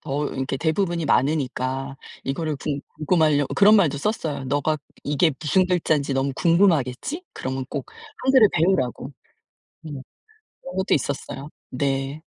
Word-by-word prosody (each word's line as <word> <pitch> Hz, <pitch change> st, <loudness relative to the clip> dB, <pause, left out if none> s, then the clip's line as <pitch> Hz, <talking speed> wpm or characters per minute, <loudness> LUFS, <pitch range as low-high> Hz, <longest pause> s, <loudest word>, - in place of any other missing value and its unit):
더 145 Hz, 0 st, -2 dB
이렇게 135 Hz, 0 st, -3 dB
대부분이 170 Hz, 0 st, 0 dB
많으니까 135 Hz, -1 st, 0 dB, 0.3 s
이거를 150 Hz, +2 st, -2 dB
궁 140 Hz, 0 st, -3 dB, 0.2 s
궁금하라고 155 Hz, -3 st, +2 dB
그런 205 Hz, +2 st, +6 dB
말도 165 Hz, -9 st, +4 dB
썼어요. 155 Hz, -6 st, -2 dB
"너가 145 Hz, +3 st, 0 dB, 0.3 s
이게 145 Hz, +2 st, +2 dB
무슨 185 Hz, +4 st, +2 dB
글자인지 155 Hz, -6 st, +1 dB
너무 135 Hz, +1 st, 0 dB
궁금하겠지? 170 Hz, -, +2 dB
그러면 130 Hz, 0 st, -4 dB
꼭 140 Hz, -3 st, -4 dB, 0.4 s
한글을 260 Hz, -5 st, +6 dB
배우라고." 145 Hz, -6 st, +1 dB, 0.7 s
네. 160 Hz, -, -9 dB, 0.7 s
그런 270 Hz, -, -8 dB
것도 190 Hz, +1 st, +2 dB
있었어요. 140 Hz, 0 st, -3 dB, 0.2 s
네. 135 Hz, +3 st, -2 dB
150 Hz, 320 characters per minute, -23 LUFS, 135-170 Hz, 0.7 s, 그런